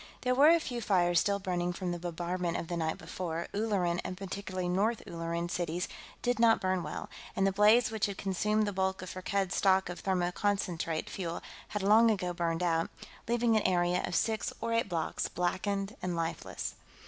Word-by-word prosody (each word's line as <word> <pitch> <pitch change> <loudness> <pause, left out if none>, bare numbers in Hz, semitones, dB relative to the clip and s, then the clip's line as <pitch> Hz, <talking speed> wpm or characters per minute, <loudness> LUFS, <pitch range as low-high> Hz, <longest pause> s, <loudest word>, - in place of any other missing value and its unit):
There 250 0 +2
were 280 +4 +7
a 335 0 +6
few 245 -6 -4
fires 175 -4 +3
still 200 -1 +1
burning 180 -2 -1
from 180 0 -3
the 175 - -3
bombardment 175 0 -2
of 165 - -5
the 175 - -1
night 160 -1 -1
before 170 0 -4
Ulleran, 195 -5 0
and 185 - -5
particularly 185 -1 -4
North 205 +6 +1
Ulleran, 170 0 -3
cities 175 0 -2 0.4
did 245 -1 +1
not 230 -1 +5
burn 185 -1 0
well 150 - -5 0.3
and 195 - +2
the 195 - +3
blaze 210 +4 +5
which 220 -2 0
had 200 -1 -5
consumed 210 +3 +1
the 205 - -2
bulk 190 0 -1
of 185 - -6
Firkked's 190 0 -1
stock 190 -1 +3
of 175 - -6
thermoconcentrate 180 -2 0
fuel 170 -3 -4 0.2
had 210 -2 -3
long 220 +3 +6
ago 185 -5 0
burned 170 0 -1
out, 165 -1 +1 0.4
leaving 235 -1 +2
an 215 - +4
area 180 -1 +2
of 175 - -2
six 220 +3 0
or 230 0 -1
eight 230 -3 +1
blocks 165 -3 -1
blackened 195 +4 -1
and 180 -1 -2
lifeless. 165 0 -3
185 Hz, 190 wpm, -31 LUFS, 175-205 Hz, 0.4 s, were